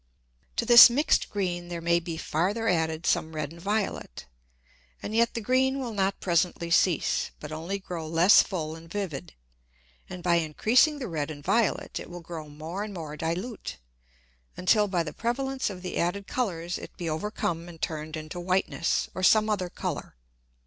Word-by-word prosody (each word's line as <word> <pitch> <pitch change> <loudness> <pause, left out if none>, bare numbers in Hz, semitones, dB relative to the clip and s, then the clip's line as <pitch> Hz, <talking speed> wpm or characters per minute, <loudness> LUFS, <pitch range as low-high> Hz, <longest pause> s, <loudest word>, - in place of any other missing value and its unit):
To 235 - 0
this 235 +1 +11
mix'd 285 +6 +2
green 175 -4 -2
there 175 -1 -5
may 170 +1 +2
be 165 -1 -6
farther 195 +10 -1
added 160 -2 0
some 160 0 +1
red 150 -1 -3
and 170 +1 -12
violet, 200 - -2 0.8
and 215 - -4
yet 235 +1 +2
the 230 - -2
green 260 +4 +2
will 245 -4 -4
not 195 -1 0
presently 170 -1 0
cease, 170 0 +2
but 150 - -8
only 165 +6 -3
grow 175 -4 -6
less 165 +5 +6
full 160 -5 -4
and 165 0 -13
vivid, 170 - -5 0.7
and 180 -1 -8
by 170 -1 +3
increasing 220 - +3
the 265 - -5
red 155 -5 -3
and 145 -2 -8
violet, 230 +6 0
it - - -9
will 175 0 -8
grow 165 -2 -8
more 160 +7 -5
and 210 -2 -7
more 155 -3 -6
dilute, 175 +9 -4 0.8
until 210 +3 +3
by 180 -3 0
the 150 -2 -6
prevalence 265 - -2
of 185 -2 -8
the 180 - -3
added 195 +4 -1
Colours 175 -9 -2
it - - -11
be 175 - -4
overcome 170 0 -2
and 165 -2 -12
turned 155 0 -4
into 155 +3 -7
whiteness, 180 -1 0
or 185 - -5
some 215 +3 +5
other 185 -4 -1
Colour. - - -5
175 Hz, 175 wpm, -27 LUFS, 165-210 Hz, 0.8 s, this